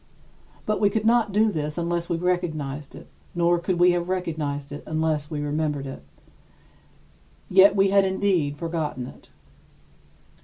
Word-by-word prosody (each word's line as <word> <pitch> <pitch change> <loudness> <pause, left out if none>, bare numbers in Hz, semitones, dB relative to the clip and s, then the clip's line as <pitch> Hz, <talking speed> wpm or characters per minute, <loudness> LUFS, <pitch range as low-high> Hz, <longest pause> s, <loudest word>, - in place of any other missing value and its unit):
But 215 0 -1
we 205 - +5
could 220 +1 -2
not 230 -2 +3
do 215 +2 +3
this 150 -3 -3
unless 170 0 -2
we 170 - 0
recognized 155 -6 -2
it, - - -11 0.3
nor 175 0 +2
could 175 +1 -1
we 180 0 +6
have 175 0 -1
recognized 150 -6 -3
it 145 - -6
unless 155 -2 -1
we 150 -3 -3
remembered 150 -1 -2
it. 135 - -7 1.5
Yet 195 +2 +7
we 195 -1 +3
had 200 0 +5
indeed 190 -6 0
forgotten 160 -6 -3
it. - - -13
170 Hz, 150 wpm, -24 LUFS, 150-190 Hz, 1.5 s, Yet